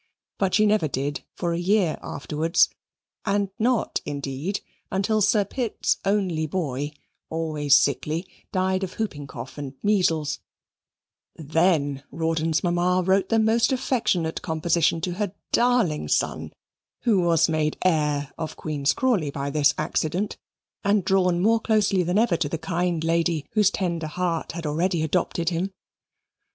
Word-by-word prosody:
But 190 -2 +2
she 215 - +4
never 210 -6 +3
did 140 +1 -3
for 170 -1 -1
a 170 - -1
year 185 -2 +2
afterwards, 155 +4 +1 0.5
and 200 -1 0
not, 240 +1 +1
indeed, 140 +6 -3 0.3
until 205 +3 +1
Sir 205 0 +3
Pitt's 240 -1 -1
only 190 -6 0
boy, 145 -4 -3 0.4
always 155 -3 +3
sickly, 150 +5 0 0.2
died 185 0 0
of 185 -1 -4
hooping 150 -11 -4
cough 135 +2 -8
and 135 -2 -6
measles 165 -8 +1 1.0
then 155 -3 +1
Rawdon's 160 0 0
mamma 180 +1 +2
wrote 190 0 +2
the 225 - +3
most 225 +3 +3
affectionate 225 -11 0
composition 165 0 +1
to 180 - -2
her 200 +1 -3 0.2
darling 235 -11 +2
son, - - 0 0.5
who 215 -6 +3
was 170 -2 +3
made 155 -2 0
heir 150 -5 +1
of 160 -1 -4
Queen's 145 -3 0
Crawley 220 - +1
by 140 0 -3
this 145 0 +3
accident, 160 +5 -1 0.5
and 200 -2 +2
drawn 180 -2 +2
more 225 +5 +3
closely 210 -4 +2
than 180 +2 0
ever 215 -6 +3
to 160 -4 -1
the 165 - -2
kind 175 0 -1
lady, 165 -2 +1
whose 210 -3 +4
tender 170 -5 -2
heart 170 +1 -2
had 170 -1 -6
already 165 +3 0
adopted 170 +1 0
him. 180 +3 -2
170 Hz, 140 wpm, -24 LUFS, 155-195 Hz, 1.0 s, she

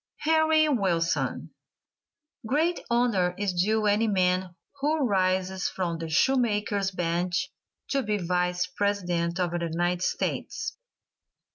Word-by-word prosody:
HENRY 315 0 +4
WILSON. 180 - 0 1.0
Great 320 +7 +1
honor 225 -7 +2
is 200 -2 -1
due 215 +5 +1
any 210 +2 +3
man 185 -2 +1 0.2
who 295 0 +1
rises 185 -2 0
from 170 -3 -3
the 165 -1 -5
shoe 265 +12 +3
maker's 205 -4 0
bench 175 0 -1 0.4
to 275 - +1
be 210 -4 -1
Vice 180 0 0
President 180 -3 -1
of 175 -2 0
the 175 - -2
United 175 +1 -1
States. 440 - -2
190 Hz, 120 wpm, -27 LUFS, 180-230 Hz, 1.0 s, HENRY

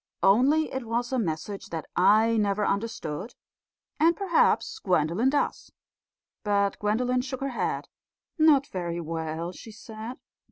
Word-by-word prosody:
Only 265 +11 +4
it 260 -3 -4
was 240 +2 -2
a 260 - +1
message 185 +1 -4
that 165 -2 -5
I 220 +5 +4
never 205 -1 +1
understood; 200 -2 -3 0.6
and 330 +2 +4
perhaps 395 +3 +2
Gwendolen 180 - +1
does." 290 +1 -1 0.7
But 200 -1 +1
Gwendolen 245 +4 +1
shook 260 0 -6
her 275 - -1
head. 245 - -2 0.5
"Not 300 -4 +5
very 175 -5 -4
well," 165 +1 -4
she 225 - -12
said. 220 +3 -8
220 Hz, 130 wpm, -27 LUFS, 185-255 Hz, 0.7 s, Not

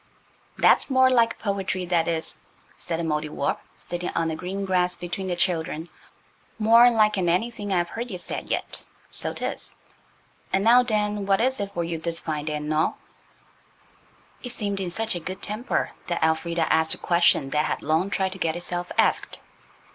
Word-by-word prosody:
"That's - - +5
more 260 -1 +5
like 230 -2 +3
poetry, 195 -3 -2
that 170 -2 +1
is," 165 -1 -2 0.4
said 165 -2 -4
the - - -1
Mouldiwarp, 150 -2 -1 0.2
sitting 175 0 -4
on 165 -1 +1
the 160 - -2
green 190 +4 -4
grass 180 -1 +1
between 180 +2 -5
the 180 - -1
children; 165 -2 -1 0.7
"more 230 +2 +7
lik'n 210 -6 +2
anything 205 +3 -1
I've 175 -2 +1
heard 235 +2 -5
ye 185 - -4
say 175 - -5
yet–so - - -3
'tis. - - -4 0.8
An' 195 - +2
now 240 +3 +7
den, 210 -4 -1
what 195 -1 +3
is 260 +1 +1
it 200 -1 -3
for 170 - 0
you 165 -1 -3
dis 165 +1 -1
fine 150 -2 -3
day 155 -1 -2
an' 150 +1 -2
all?" 155 +1 +1 1.4
It 245 - -5
seemed 205 -4 -2
in 185 -2 -2
such 225 +5 -1
a 175 - -3
good 185 +3 -7
temper 215 +4 -1 0.2
that 175 -2 -1
Elfrida 165 +1 +1
asked 160 0 +2
a - - -11
question 170 -5 +3
that 150 +1 +2
had - - -2
long 160 +6 +1
tried 190 -1 0
to 190 - -9
get 165 -2 0
itself 175 0 -3
asked. - - +1
180 Hz, 180 wpm, -25 LUFS, 165-210 Hz, 1.4 s, more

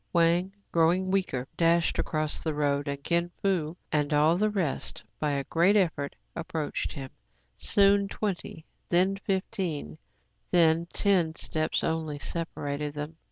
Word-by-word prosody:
Wang, 170 +2 +3 0.2
growing 175 +3 +3
weaker, 160 -10 0
dashed 170 0 +3
across 155 -1 -1
the 160 -2 -2
road; 145 -1 0
and 140 0 -4
Kin 170 +1 +1
Fo 175 -4 0
and 150 -1 +1
the 160 +8 +3
rest, 180 -9 -2 0.2
by 150 - 0
a 140 -1 -1
great 170 +8 +3
effort, 160 -8 +1 0.2
ap 165 - -5
proached 155 -3 -2
him. 135 -2 -7 0.4
Soon 200 0 +4
twenty, 195 -4 -4 0.2
then 185 +3 +3
fifteen, 185 - -3 0.5
then 165 -1 +4
ten 175 -5 +2
steps 155 -1 -1
only, 160 -2 -1
separated 145 -2 -3
them. 150 +2 -5
165 Hz, 135 wpm, -28 LUFS, 150-185 Hz, 0.5 s, Soon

